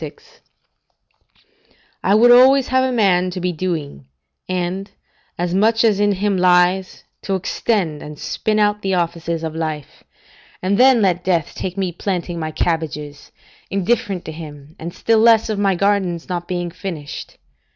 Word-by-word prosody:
] - - -37
I 200 - +3
would 240 +3 +6
always 260 +2 +6
have 260 0 +3
a 260 - 0
man 190 -6 +2
to 180 +1 -5
be 180 0 -1
doing, 155 - -4 0.4
and, 185 +2 -3 0.5
as 175 0 -2
much 220 +4 +3
as 215 -3 +3
in 205 0 +3
him 200 0 0
lies, 180 +1 +2 0.2
to 195 - -2
extend 185 -4 -1
and 150 0 -9
spin 215 +7 -2
out 210 0 +2
the 195 -2 0
offices 170 -1 -2
of 160 -1 -4
life; 155 -3 -5 0.6
and 195 +3 0
then 255 -3 +6
let 180 -2 +1
death 170 -4 0
take 185 +1 -5
me 190 -2 -1
planting 175 -1 -3
my 155 -1 -3
cabbages, 150 -3 -3 0.4
indifferent 195 -1 -1
to - - -6
him, 150 -1 -11
and 170 +2 -6
still 225 +5 +1
less 225 0 +5
of 210 -2 -2
my 195 -2 +2
gardens 190 -3 0
not 175 -1 -4
being 175 -2 -3
finished. 170 -5 -7
185 Hz, 160 wpm, -19 LUFS, 170-205 Hz, 0.6 s, would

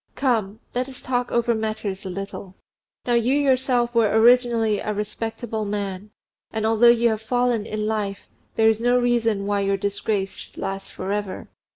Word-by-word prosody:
Come! 220 -6 0
let 250 +2 -1
us 260 - -9
talk 245 -1 -2
over 235 0 +2
matters 215 -3 -3
a - - -4
little. 195 0 -7 0.5
Now 245 - +1
you 240 +3 +3
yourself 255 -4 +2
were 230 -3 +3
originally 230 -1 +4
a 210 - -3
respectable 220 +2 -3
man; 200 -1 -4 0.4
and 220 -1 -2
although 225 +2 +5
you 235 0 +4
have 220 -1 -2
fallen 245 -1 0
in 215 0 -3
life, 210 -2 -3 0.3
there 220 -1 +4
is 220 0 +3
no 245 +1 +3
reason 230 -4 +1
why 205 0 0
your 195 0 +1
disgrace 200 0 -2
should - - -12
last 195 0 -5
for 190 +1 -5
ever. 205 -2 -4
220 Hz, 175 wpm, -23 LUFS, 205-240 Hz, 0.5 s, although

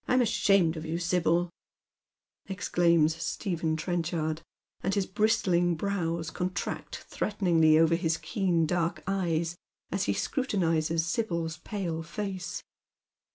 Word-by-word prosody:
1 - - +2
m 255 - +5
ashamed 195 -6 +3
of 155 - -5
you, 160 +1 -3
Sibj'l," 175 0 +1 1.0
exclaims 170 -4 +2
Stephen 165 -5 -1
Trenchard, 165 -1 -2 0.4
and 195 +2 0
his 200 -2 +1
bristling 185 -5 +2
brows 165 -3 -2
contract 185 +1 -4
threateningly 170 -7 +3
over 165 +1 +4
his 165 -1 +1
keen 180 -7 0
dark 170 +1 -1
eyes 170 -3 0 0.4
as - - 0
he - - +1
scrutinizes 165 - 0
Sibyl's 170 -6 -2
pale 170 -2 -4
face. 185 +1 -5
170 Hz, 115 wpm, -29 LUFS, 165-195 Hz, 1.0 s, m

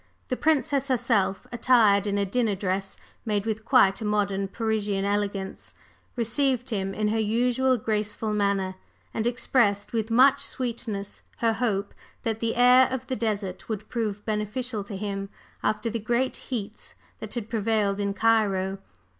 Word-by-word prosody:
The 255 - 0
Princess 285 -2 +1
herself, 235 -6 +1
attired 225 -5 +4
in 205 0 0
a 200 - +1
dinner 220 +1 0
dress 195 0 -2 0.3
made 210 -2 -1
with 220 0 -2
quite 230 -5 +4
a - - -3
modern 200 -2 0
Parisian 210 -2 -1
elegance, 200 -1 -2 0.4
received 250 +2 0
him 195 -2 -2
in 215 0 0
her 225 +1 0
usual 245 +4 +2
graceful 215 0 -2
manner, 200 -2 +1 0.4
and 225 +1 0
expressed 235 -4 +1
with 225 -1 -1
much 265 +4 +5
sweetness 230 -7 -3 0.2
her 230 -1 +2
hope 215 -4 -1 0.3
that 225 -1 -1
the 230 0 -1
air 250 +1 +6
of 260 0 -3
the 260 - -2
desert 205 -4 -3
would 215 -1 -4
prove 210 -3 -3
beneficial 215 +1 -2
to 200 -1 -6
him 195 -1 -4 0.3
after 215 +1 0
the 230 0 -2
great 240 +4 0
heats 220 -4 -6 0.2
that 220 +1 -6
had 230 -3 -3
prevailed 215 -3 0
in 200 -1 -1
Cairo. 195 -4 +2
215 Hz, 155 wpm, -26 LUFS, 200-240 Hz, 0.4 s, air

